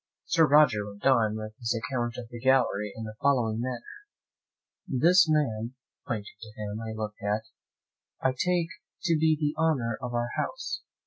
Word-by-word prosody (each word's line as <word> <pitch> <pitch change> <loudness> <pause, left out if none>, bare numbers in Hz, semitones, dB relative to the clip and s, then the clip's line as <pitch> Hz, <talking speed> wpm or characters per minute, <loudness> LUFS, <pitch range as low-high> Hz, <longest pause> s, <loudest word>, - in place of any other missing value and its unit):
Sir 165 -2 +4
Roger 140 -9 +5
went 100 +2 -12
on 115 -5 +4
with 110 0 -7
his 115 -1 -1
account 120 -1 -2
of 120 - -6
the 120 -1 -8
gallery 115 -5 +2
in 110 - -6
the 110 -1 -6
following 120 -6 +2
manner. 125 -1 -3 1.0
"This 170 +6 +5
man 125 -6 0 0.3
(pointing 110 -5 -4
to 110 -1 -10
him 105 +1 -4
I 110 -1 -5
looked 110 -1 -5
at) 105 +2 0 0.8
I 130 - +2
take 170 +5 0 0.3
to 170 -3 +3
be 160 0 +3
the 150 -1 0
honour 130 -9 +1
of 125 -1 -4
our 120 0 0
house. - - -3
120 Hz, 170 wpm, -28 LUFS, 110-145 Hz, 1.0 s, Roger